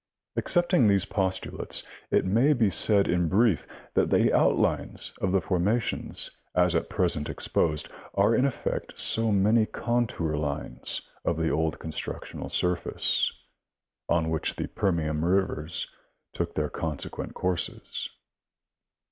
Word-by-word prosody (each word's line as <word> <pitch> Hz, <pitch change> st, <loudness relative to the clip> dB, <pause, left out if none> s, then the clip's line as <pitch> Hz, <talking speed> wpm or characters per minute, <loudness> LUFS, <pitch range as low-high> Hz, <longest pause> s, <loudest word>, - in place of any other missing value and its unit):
Accepting 175 Hz, -, +3 dB
these 100 Hz, -2 st, +3 dB
postulates, 95 Hz, -2 st, -1 dB, 0.3 s
it -, -, +2 dB
may 115 Hz, +10 st, +4 dB
be 115 Hz, -7 st, +2 dB
said 100 Hz, +3 st, +4 dB
in 90 Hz, -1 st, +1 dB
brief 100 Hz, -, +2 dB, 0.3 s
that -, -, +2 dB
the -, -, +3 dB
outlines -, -, +1 dB
of 95 Hz, -, +1 dB
the 95 Hz, -1 st, +2 dB
formations 100 Hz, +7 st, -1 dB
as 90 Hz, -1 st, +3 dB
at 85 Hz, -, 0 dB
present 85 Hz, -6 st, +1 dB
exposed 75 Hz, -2 st, 0 dB, 0.3 s
are 100 Hz, +3 st, +4 dB
in 125 Hz, -, +3 dB
effect 140 Hz, -3 st, -3 dB
So 115 Hz, -1 st, +4 dB
many 105 Hz, +3 st, +3 dB
contour 115 Hz, -10 st, -1 dB
lines 75 Hz, -1 st, -2 dB, 0.2 s
of -, -, 0 dB
the 80 Hz, -1 st, 0 dB
old 80 Hz, +1 st, 0 dB
constructional 80 Hz, -1 st, -6 dB
surface, 90 Hz, -1 st, +1 dB, 0.8 s
on 80 Hz, -2 st, +1 dB
which 80 Hz, -, -1 dB
the -, -, -3 dB
Permian 80 Hz, -5 st, -1 dB
rivers 85 Hz, -3 st, 0 dB, 0.5 s
took -, -, -3 dB
their -, -, 0 dB
consequent 80 Hz, -3 st, -5 dB
courses. 90 Hz, -2 st, -2 dB
90 Hz, 125 wpm, -27 LUFS, 80-110 Hz, 0.8 s, may